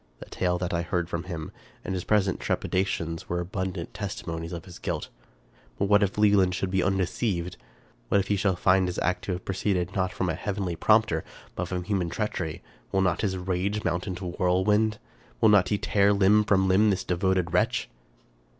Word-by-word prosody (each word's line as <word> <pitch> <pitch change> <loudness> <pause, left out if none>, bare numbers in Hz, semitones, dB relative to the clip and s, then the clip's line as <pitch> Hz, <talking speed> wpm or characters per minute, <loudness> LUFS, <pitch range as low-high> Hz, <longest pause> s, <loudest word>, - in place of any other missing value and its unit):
The - - -10
tale 90 -1 -1
that 90 0 -3
I 85 - +1
heard 85 0 -1
from 85 +1 -3
him, 85 -4 -6 0.3
and 95 - -2
his 90 -1 -3
present 100 -3 +2
trepidations, 85 -3 -2
were 85 - -1
abundant 95 -1 -4
tes 100 -2 -4
timonies 80 -1 -5
of 85 -2 -6
his 90 - -11
guilt. - - -3 0.7
But 100 - +1
what 105 0 +5
if 100 0 0
Wieland 100 -3 +4
should 90 0 -2
be 95 0 +2
un 95 +1 +1
deceived! 90 -2 -1 0.5
What 100 - +4
if 100 - -1
he 105 - +2
shall 95 -1 +1
find 95 +1 +3
his 90 - -4
act 90 +2 -1
to 95 - -1
have 90 - -6
proceeded 95 -2 -1
not 95 -1 0
from 90 - -2
a 80 - 0
heavenly 95 0 -3
prompter, 110 -4 +3 0.3
but 90 - -3
from 90 0 -3
human 95 -3 -1
treachery! 95 -6 -3 0.3
Will 95 - +2
not 95 -1 +1
his 95 -3 -1
rage 95 +3 -1
mount 90 +2 -1
into 95 0 -5
whirlwind? 105 +4 +2 0.4
Will 110 - +5
not 100 -4 +5
he 105 - +1
tear 100 0 +3
limb 105 +2 +4
from 95 -2 +3
limb 100 +3 +4
this 95 -2 0
devoted 90 -1 0
wretch? - - +1
95 Hz, 200 wpm, -27 LUFS, 90-100 Hz, 0.7 s, what